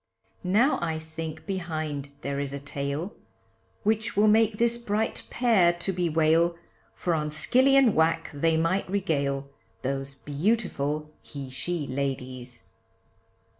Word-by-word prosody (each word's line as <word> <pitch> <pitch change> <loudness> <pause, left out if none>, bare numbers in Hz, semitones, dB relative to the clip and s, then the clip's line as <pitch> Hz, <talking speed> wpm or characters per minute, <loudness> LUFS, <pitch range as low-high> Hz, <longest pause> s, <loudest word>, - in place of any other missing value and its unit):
Now 215 +10 +3
I 165 -2 -1
think 160 0 -7
behind 155 -7 -3
there 140 0 -2
is 140 -1 -3
a 140 - -4
tale, 140 +6 -4 0.7
Which 220 +1 0
will 210 +1 +5
make 215 0 +4
this 235 +1 +3
bright 220 -1 -1
pair 220 -8 +4
to 175 +3 -2
bewail, 165 -1 +2 0.4
For 175 - -1
on 150 -2 0
skilly 255 - +4
and 265 -6 +6
whack 165 +1 +2
they 160 +3 +2
might 175 +4 +1
regale, 140 -8 -1 0.3
Those 135 +1 -3
beautiful 150 -2 -1
he 140 -3 -8
she 160 +4 -3
ladies. 130 -3 -4
160 Hz, 130 wpm, -27 LUFS, 140-200 Hz, 0.7 s, and